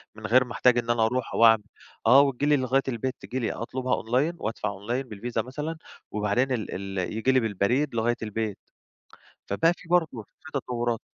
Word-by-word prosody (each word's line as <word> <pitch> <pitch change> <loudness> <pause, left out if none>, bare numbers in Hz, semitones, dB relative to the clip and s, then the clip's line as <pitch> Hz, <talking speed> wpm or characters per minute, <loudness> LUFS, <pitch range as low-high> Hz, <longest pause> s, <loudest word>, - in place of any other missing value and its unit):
من 110 - -9
غير 125 +3 +5
ما 125 - -11
أحتاج 125 +1 +3
إن 120 -1 -1
أنا 120 -1 +3
أروح 125 +3 -2
وأعمل 115 -2 +6 0.4
آه، 135 +2 +8
وتيجي 140 0 0
لي 150 0 +4
لغاية 130 +1 +2
البيت، 130 +1 -2
تيجي 130 - -4
لي 115 - -1
أطلبها 130 +2 -2
online 130 +9 +1
وأدفع 110 +2 -2
online 105 +7 -3
بالvisa 115 0 -3
مثلًا، 150 +5 -5 0.3
وبعدين 105 +5 0
ال 115 -4 -2 0.3
ال 90 - -2
ييجي 115 +4 +1
لي 130 - +4
بالبريد 115 +5 0
لغاية 115 +1 +1
البيت. 110 -1 -3 0.9
فبَقى 165 - +3
في 170 - -16
برضه 160 -10 +1 0.2
في 155 - -13
تطورات. 120 -3 -2
120 Hz, 185 wpm, -26 LUFS, 110-130 Hz, 0.9 s, آه